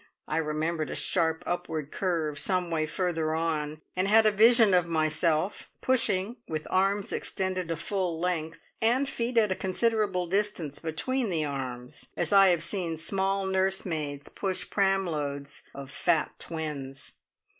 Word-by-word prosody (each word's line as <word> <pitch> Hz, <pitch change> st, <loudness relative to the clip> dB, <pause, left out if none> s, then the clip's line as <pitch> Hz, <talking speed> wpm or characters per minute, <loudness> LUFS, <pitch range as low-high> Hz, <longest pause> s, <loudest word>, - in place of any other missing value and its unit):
I 155 Hz, -, -1 dB
remembered 155 Hz, 0 st, -1 dB
a -, -, -4 dB
sharp 160 Hz, 0 st, 0 dB
upward 160 Hz, -4 st, -3 dB
curve 160 Hz, -6 st, -1 dB
some 180 Hz, -3 st, 0 dB
way 155 Hz, -1 st, 0 dB
further 160 Hz, -2 st, -1 dB
on, 155 Hz, -2 st, -2 dB
and 185 Hz, +1 st, +1 dB
had 220 Hz, +2 st, +6 dB
a 215 Hz, -, +6 dB
vision 225 Hz, 0 st, +6 dB
of 180 Hz, -2 st, +4 dB
myself 160 Hz, +2 st, 0 dB
pushing, 230 Hz, -3 st, +1 dB
with 155 Hz, -1 st, -3 dB
arms 195 Hz, +2 st, +2 dB
extended 185 Hz, -2 st, -2 dB
to 165 Hz, -, -1 dB
full 175 Hz, 0 st, -2 dB
length, 165 Hz, -2 st, -3 dB
and 245 Hz, +5 st, +3 dB
feet 235 Hz, -1 st, -2 dB
at 215 Hz, -3 st, +4 dB
a -, -, +2 dB
considerable 195 Hz, -1 st, +1 dB
distance 185 Hz, -5 st, -1 dB
between 220 Hz, -, -1 dB
the 160 Hz, -4 st, 0 dB
arms, 130 Hz, -3 st, -5 dB
as -, -, 0 dB
I 195 Hz, -1 st, +8 dB
have 175 Hz, -3 st, +3 dB
seen 170 Hz, -3 st, -1 dB
small 195 Hz, +3 st, 0 dB
nursemaids 180 Hz, -7 st, -1 dB
push 190 Hz, -2 st, -3 dB
pram 195 Hz, -1 st, +2 dB
loads 140 Hz, -4 st, -3 dB
of 140 Hz, -1 st, -8 dB
fat 165 Hz, -3 st, +1 dB
twins. 150 Hz, -5 st, -5 dB
175 Hz, 150 wpm, -28 LUFS, 155-195 Hz, -, I